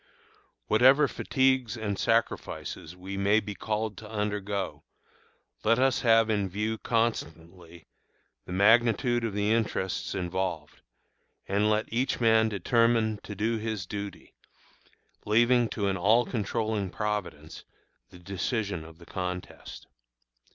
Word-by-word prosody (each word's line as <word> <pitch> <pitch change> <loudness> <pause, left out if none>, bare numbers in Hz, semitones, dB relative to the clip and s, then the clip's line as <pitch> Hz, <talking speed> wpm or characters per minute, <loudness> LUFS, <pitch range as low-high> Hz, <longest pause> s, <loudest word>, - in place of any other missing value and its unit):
Whatever 130 +6 +5
fatigues 130 -4 +1
and 105 -2 -2
sacrifices 85 -2 -2
we 95 +2 -7
may 100 +2 +3
be 105 -1 -6
called 105 0 -3
to 105 - -11
undergo, 105 -2 -3 0.8
let 115 +2 +3
us 130 0 +2
have 115 -1 +4
in 100 -3 0
view 105 +4 -2
constantly 85 -7 -3 0.6
the - - -8
magnitude 115 +4 +3
of 115 -3 -2
the 105 +1 +1
interests 110 -4 -1
involved, 90 -4 -3 0.7
and 105 +2 +1
let 110 +1 +1
each 125 +3 0
man 110 -1 +4
determine 110 +1 +2
to 105 - -8
do 110 +3 -1
his 110 -4 -3
duty, 100 +1 -7 0.9
leaving 120 +2 +3
to 100 -2 -2
an 95 -1 0
all 110 +7 +4
controlling 110 -3 -2
Providence 105 -7 -4 0.5
the - - -14
decision 100 0 -3
of 80 0 -13
the 85 - -15
contest. 90 0 -6
105 Hz, 125 wpm, -28 LUFS, 95-115 Hz, 0.9 s, Whatever